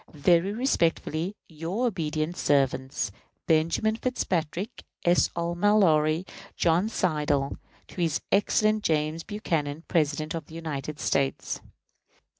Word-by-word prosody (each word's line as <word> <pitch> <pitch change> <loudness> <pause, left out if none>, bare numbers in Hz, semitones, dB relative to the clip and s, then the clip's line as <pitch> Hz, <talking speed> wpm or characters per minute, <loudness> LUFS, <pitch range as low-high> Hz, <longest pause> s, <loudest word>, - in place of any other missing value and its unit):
Very 170 +5 +3
respectfully, 185 - 0
your 165 +9 -3
obedient 160 -6 -1
servants, 135 - +1 0.3
BENJAMIN 165 +8 +2
FITZPATRICK, 185 -6 -2 0.2
S. 175 0 +4
R. 170 0 -1
MALLORY, 175 -4 +3 0.3
JOHN 175 +5 +2
SLIDELL. 150 -8 0 0.3
To 180 - -5
his 165 -2 +1
Excellency 215 +1 +3
James 155 +2 -1
Buchanan, 160 -7 -2
President 155 -1 0 0.2
United 155 -2 -5
States. 135 -2 0
165 Hz, 95 wpm, -27 LUFS, 150-185 Hz, 0.3 s, S